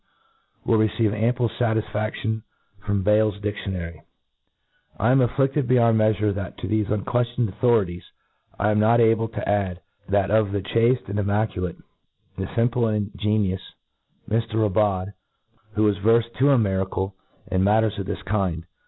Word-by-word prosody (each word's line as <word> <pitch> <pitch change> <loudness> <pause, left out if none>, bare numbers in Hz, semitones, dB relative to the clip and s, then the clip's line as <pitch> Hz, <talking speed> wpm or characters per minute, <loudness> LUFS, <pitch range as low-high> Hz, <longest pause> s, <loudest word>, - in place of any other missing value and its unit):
ed, - - -30
will 115 - +5
receive 110 0 +1
ample 120 +3 +1
fatisfaftion 110 -1 -2 0.4
from 100 -2 -1
Bayle's 105 0 +2
dic 105 0 -2
tionary, 85 -5 -5 1.0
I 115 +4 +3
am 135 - +5
afflidled 135 +2 +1
beyond 115 -3 +4
meafure, 105 -1 +2
that 100 -3 -6
to - - -5
thefe 110 -1 0
unqueftioned 120 +3 0
authorities, 100 -4 +1 0.5
I 105 - +1
am 105 - +2
not 115 +2 +4
able 115 0 +3
to 115 - -6
add 100 -3 0 0.3
that 100 0 +1
of 110 -2 +2
the 100 - -1
chafte 115 +4 +1
and 100 +2 -2
immaculate, 100 -3 -1 0.6
the 95 - -3
fimplc 120 +3 +1
and 105 0 -3
ingenuous 105 -3 0 0.7
Mr 115 +1 -1
Raubaud, 100 -2 +1 0.6
who 105 0 +2
is 100 -2 +1
verfed 115 +3 +2
to 140 +2 +4
a. 140 - +5
miracle 95 -2 -1 0.4
in 95 0 +2
matters 105 +1 +2
of 95 - -4
this - - -5
k 100 -4 0
ind. 80 +1 -8
105 Hz, 155 wpm, -23 LUFS, 100-115 Hz, 1.0 s, will